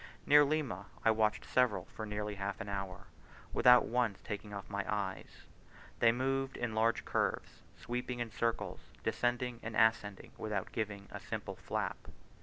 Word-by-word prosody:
Near 145 Hz, 0 st, +8 dB
Lima, 140 Hz, -10 st, -1 dB, 0.2 s
I 115 Hz, -, +7 dB
watched 110 Hz, -1 st, +1 dB
several 110 Hz, -8 st, +2 dB
for 110 Hz, +1 st, -7 dB
nearly 105 Hz, 0 st, -3 dB
half 100 Hz, 0 st, -3 dB
an -, -, -5 dB
hour, 95 Hz, -2 st, -4 dB, 0.5 s
without 125 Hz, 0 st, +7 dB
once 115 Hz, -4 st, +1 dB
taking 105 Hz, -1 st, -5 dB
off 100 Hz, -2 st, -6 dB
my 100 Hz, -1 st, -2 dB
eyes, 100 Hz, -2 st, -4 dB, 0.5 s
they 115 Hz, -, +6 dB
moved 135 Hz, +2 st, -1 dB
in 120 Hz, -2 st, -2 dB
large 115 Hz, +1 st, +2 dB
curves, -, -, -1 dB, 0.2 s
sweeping 125 Hz, +1 st, -3 dB
in 120 Hz, -2 st, -3 dB
circles, 115 Hz, +1 st, -1 dB, 0.2 s
descending 120 Hz, 0 st, 0 dB
and 115 Hz, 0 st, -5 dB
ascending 110 Hz, -3 st, +2 dB
without 105 Hz, -3 st, -2 dB
giving 105 Hz, -3 st, -3 dB
a -, -, -6 dB
single -, -, -5 dB
flap. -, -, -3 dB
110 Hz, 155 wpm, -34 LUFS, 100-120 Hz, 0.5 s, Near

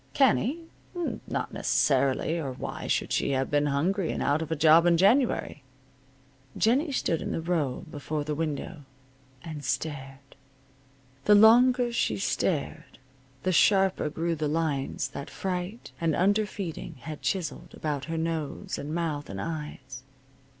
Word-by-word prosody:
Canny? 270 Hz, +3 st, +3 dB, 0.7 s
Not -, -, -3 dB
necessarily, 140 Hz, +4 st, +1 dB
or 135 Hz, -5 st, -4 dB
why 125 Hz, -, -6 dB
should -, -, 0 dB
she 140 Hz, -, +1 dB
have 130 Hz, 0 st, -1 dB
been 145 Hz, 0 st, +2 dB
hungry 165 Hz, +6 st, 0 dB
and -, -, -2 dB
out 145 Hz, +2 st, +1 dB
of 160 Hz, 0 st, -5 dB
a -, -, +1 dB
job 160 Hz, +2 st, +6 dB
in 170 Hz, -1 st, +4 dB
January? 210 Hz, -, +2 dB, 1.0 s
Jennie 270 Hz, +8 st, +2 dB
stood 170 Hz, -, 0 dB
in -, -, -3 dB
the -, -, -2 dB
row 160 Hz, -6 st, -1 dB
before 150 Hz, 0 st, -4 dB
the 150 Hz, +1 st, -3 dB
window, 155 Hz, +1 st, -3 dB, 0.6 s
and 155 Hz, -3 st, -7 dB
stared. 135 Hz, -1 st, -4 dB, 0.9 s
The 210 Hz, -, +7 dB
longer 240 Hz, +3 st, +6 dB
she 110 Hz, -, 0 dB
stared 100 Hz, -, -2 dB, 0.5 s
the 185 Hz, -, +1 dB
sharper 190 Hz, -2 st, +3 dB
grew 165 Hz, +2 st, -1 dB
the 155 Hz, -1 st, -2 dB
lines 150 Hz, -3 st, -1 dB
that 140 Hz, -, -7 dB
fright 185 Hz, +4 st, -4 dB
and 165 Hz, -2 st, +1 dB
under 205 Hz, +3 st, +2 dB
feeding 180 Hz, -6 st, -6 dB
had 155 Hz, -2 st, -7 dB
chiseled 175 Hz, -2 st, -3 dB
about 145 Hz, -3 st, -3 dB
her 165 Hz, +1 st, -3 dB
nose, 160 Hz, -2 st, -3 dB
and 150 Hz, +3 st, -4 dB
mouth, 155 Hz, -4 st, -2 dB
and 95 Hz, 0 st, -6 dB
eyes. 135 Hz, -2 st, -6 dB
160 Hz, 145 wpm, -27 LUFS, 145-190 Hz, 1.0 s, The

